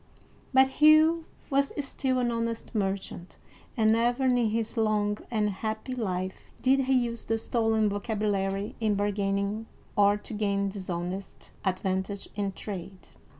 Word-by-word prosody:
But 265 0 +6
Hugh 315 +2 +6 0.3
was 275 0 +2 0.2
still 260 -1 -1
an 245 -1 +1
honest 230 0 -3
merchant, 195 -4 -3 0.4
and 220 -1 +4
never 240 +3 +2
in 255 -1 +4
his 225 -2 0
long 210 -2 +1
and 210 -3 +1
happy 220 +5 -4
life 190 -6 -3
did 265 +1 +3
he 265 - +2
use 240 -2 0
the 225 - +1
stolen 225 -1 +1
vocabulary 205 -1 -1
in 215 -2 +1
bargaining, 200 +1 -1 0.3
or 205 0 +5
to 210 - -10
gain 200 -2 0
dishonest 185 -1 -5
advantage 190 +1 -2
in 200 -1 -1
trade. 190 -3 -8
215 Hz, 135 wpm, -28 LUFS, 200-235 Hz, 0.4 s, But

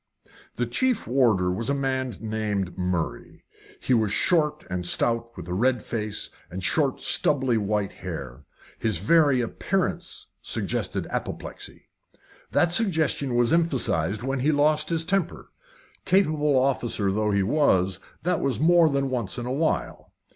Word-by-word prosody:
The 120 - 0
chief 240 - 0
warder 110 -8 +2
was 115 +8 -3
a 140 - +1
man 130 -2 -1
named 105 -4 -2
Murray. 90 -2 -3 0.4
He 130 - 0
was 110 -4 +2
short 150 - +1
and 90 -1 -3
stout, 115 +6 +1
with 90 -2 -8
a 90 - -3
red 120 +4 +1
face, 110 -3 -4 0.2
and 95 +2 -6
short, 140 - +1
stubbly 130 -4 +1
white 105 -1 -1
hair 75 -7 -7 0.4
his 110 -5 0
very 140 - +4
appearance 185 - -2 0.2
suggested - - -2
apoplexy. - - -6 0.6
That 175 -1 +2
suggestion 160 - +1
was 120 +2 +3
emphasised 120 - +1
when 135 +1 -1
he 145 +5 +2
lost 150 +1 +2
his 165 -1 0
temper 195 0 -2 0.5
capable 155 -7 +2
officer 120 -6 +1
though 105 +2 0
he 100 -1 +2
was, 95 - +2 0.2
that 180 - 0
was 135 -2 -1
more 170 +1 +5
than 140 -1 -1
once 120 -5 -3
in 120 - -4
a 125 - -2
while. 155 +3 -2
125 Hz, 145 wpm, -25 LUFS, 100-150 Hz, 0.6 s, more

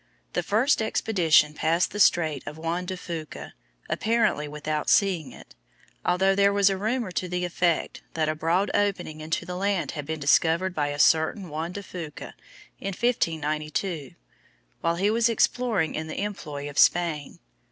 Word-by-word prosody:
The - - +1
first 230 +6 +2
expedition 170 -9 +3
passed 165 +3 +1
the 205 - -5
Strait 160 -8 +3
of 150 - -6
Juan 170 +3 -3
de 185 0 -4
Fuca 165 -3 -7 0.3
apparently 220 -9 +1
without 150 +1 -3
seeing 185 -7 +2
it, - - -14 0.5
although 190 +2 +3
there 200 0 +4
was 200 -1 +4
a - - 0
rumor 220 0 -1
to 180 +1 -3
the 180 0 -1
effect 175 -1 0
that 160 -1 +1
a 155 - +1
broad 165 +6 0
opening 180 -6 -1
into 160 +1 -2
the 180 - -5
land 195 -1 -1
had 150 -3 -6
been 160 0 -3
discovered 165 +5 +2
by 150 -4 0
a 145 0 -4
certain 160 +5 +3
Juan 160 +3 -4
de 200 - -6
Fuca 170 -5 -8 0.5
in 195 - -4
1592, 155 - -1 0.7
while 165 0 +1
he 200 +4 +1
was 230 +1 +3
exploring 230 -7 +1
in 160 0 -4
the 155 - -5
employ 150 -9 -5
of 145 -1 -3
Spain. 165 -5 +2
170 Hz, 165 wpm, -26 LUFS, 155-195 Hz, 0.7 s, there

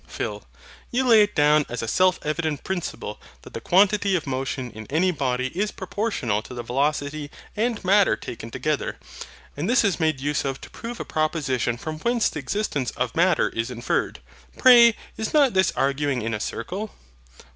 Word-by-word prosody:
PHIL. - - -5 0.4
You 255 +1 0
lay 225 -3 +7
it 205 0 +1
down 150 +1 +4
as 120 -1 -4
a - - -3
self 185 +8 +3
evident 155 -1 -2
principle 175 - -4 0.2
that - - -13
the - - -5
quantity 200 +1 +3
of 170 - -1
motion 130 -2 -3
in 110 -1 -10
any 175 +6 +2
body 130 -4 -1
is 200 +8 -1
proportional 150 - -2
to 125 - -10
the 120 - -5
velocity 145 +3 -1 0.3
and 225 -1 -1
MATTER 200 +1 +4
taken 115 0 -8
together; 150 +5 -2 0.6
and 150 +8 -2
this 245 0 +4
is 200 -4 +1
made 155 -4 +1
use 145 +1 -1
of 135 -1 -3
to - - -11
prove 235 0 -7
a - - -4
proposition 140 -7 -1
from 155 +4 -6
whence 235 +4 +1
the - - -6
existence 150 - -2
of 125 -2 -2
MATTER 175 -1 +3
is 115 +1 -3
inferred. 120 - -2 0.4
Pray 235 -3 +7 0.2
is 220 +7 -3
not 280 -5 +5
this 190 -1 +3
arguing 140 -2 0
in 115 +1 -2
a 105 - -2
circle? 190 - -4
155 Hz, 180 wpm, -24 LUFS, 130-200 Hz, 0.6 s, lay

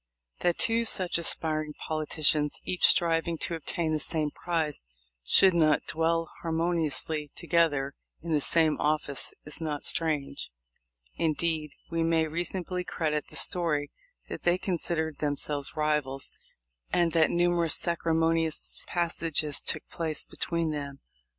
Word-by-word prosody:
That 175 -1 +1
two 230 0 +3
such 185 -6 +1
aspiring 155 -2 -2
politicians, 155 -1 +1
each 180 - +4
striving 165 0 +3
to 170 - -1
obtain 165 0 -2
the 155 - 0
same 155 -1 -1
prize, 160 -4 -2 0.4
should 190 - +7
not 155 -3 +3
dwell 165 +1 0
harmoniously 160 -3 0
together 160 -5 +1 0.3
in 170 - -4
the 150 -2 +2
same 160 +1 +3
office 150 -2 0
is 150 +2 -7
not 150 -2 -3
strange. 150 -4 0 0.7
Indeed, 160 -1 0 0.2
we 165 0 0
may 165 -1 +2
reasonably 175 +3 -3
credit 155 -4 -2
the - - -13
story 155 -5 +1 0.4
that - - -6
they 175 +1 +3
com 185 -1 -2
sidered 160 -2 -1
themselves 145 0 -1
rivals, 150 -3 -1 0.6
and 170 -1 +2
that 160 -1 +4
numerous 175 -2 +2
sacri* 170 -1 -1
monious 165 -1 0
passages 165 -3 0
took 155 - -4
place 160 -3 -2
between 170 -2 -2
them. 140 -2 -6
160 Hz, 130 wpm, -28 LUFS, 150-170 Hz, 0.7 s, should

